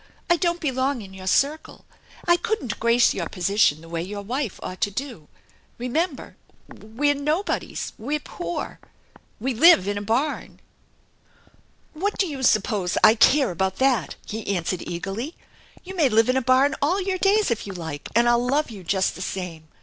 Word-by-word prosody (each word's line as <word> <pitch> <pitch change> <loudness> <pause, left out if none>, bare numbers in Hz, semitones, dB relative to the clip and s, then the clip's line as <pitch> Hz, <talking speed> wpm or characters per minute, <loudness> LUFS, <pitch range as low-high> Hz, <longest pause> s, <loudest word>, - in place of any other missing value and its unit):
I - - +7
don't 345 0 0
belong 265 -4 -1
in 190 -1 -12
your 190 0 -9
circle. 285 +10 0 0.4
I 345 - +6
couldn't 345 - -3
grace 235 +1 +4
your 170 -4 -4
position 180 -4 +2
the 165 - -13
way 165 0 -3
your 200 +3 -6
wife 245 0 -3
ought 185 0 -7
to - - +2
do. 230 - -6 0.5
Eemember, 280 +5 -2 0.3
we're 260 +7 -1
nobodies. 300 +7 -2
We're 290 +7 -2
poor! 345 +3 -6 0.6
We 260 +4 -1
live 265 - +6
in 205 0 -1
a - - -6
barn! 235 +9 -2 0.5
" - - -33
" - - -35
What 395 +7 -2
do 390 - +2
you 285 -6 -5
suppose 210 -6 +1
I 215 - +8
care 260 +2 +4
about 190 +2 -1
that? 260 -9 +1
" - - -26
he 220 0 -6
answered 180 -2 -1
eagerly. 200 - -4 0.2
" - - -26
You 380 +1 -8
may 310 -7 +3
live 225 +1 +3
in 255 - +3
a - - +2
barn 260 +3 +3
all 335 +8 +2
your 380 -1 -2
days 405 - +3
if 225 - -2
you 195 - -6
like, 160 -5 -6
and 235 +1 +4
I'll 240 0 +3
love 275 +2 0
you 200 -4 -10
just 190 +2 0
the - - -9
same. 180 -4 -5
240 Hz, 190 wpm, -24 LUFS, 195-295 Hz, 0.6 s, I